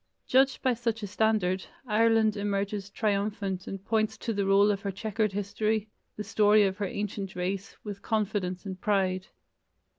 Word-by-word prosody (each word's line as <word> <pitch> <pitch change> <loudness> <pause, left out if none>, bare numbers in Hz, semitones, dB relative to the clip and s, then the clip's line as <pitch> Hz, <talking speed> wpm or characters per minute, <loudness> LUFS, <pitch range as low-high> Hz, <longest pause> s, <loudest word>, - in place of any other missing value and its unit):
Judged 265 +1 +3
by 255 - +3
such 230 -2 -2
a - - 0
standard, 205 -3 +1 0.2
Ireland 225 -1 +3
emerges 200 -1 -2
triumphant 200 -2 -1
and 195 0 -6
points 220 0 +1
to 230 - -3
the 200 -1 0
roll 200 +1 +5
of 200 -1 -2
her 200 - -3
chequered 215 +2 -1
history, 210 +2 -1 0.3
the 210 - -3
story 210 0 +4
of 190 -1 0
her 205 -2 -1
ancient 200 -1 -4
race, 185 +2 -3
with 205 -2 -6
confidence 205 -4 -1
and 190 -2 -6
pride. 190 -2 +1
205 Hz, 160 wpm, -28 LUFS, 195-215 Hz, 0.3 s, roll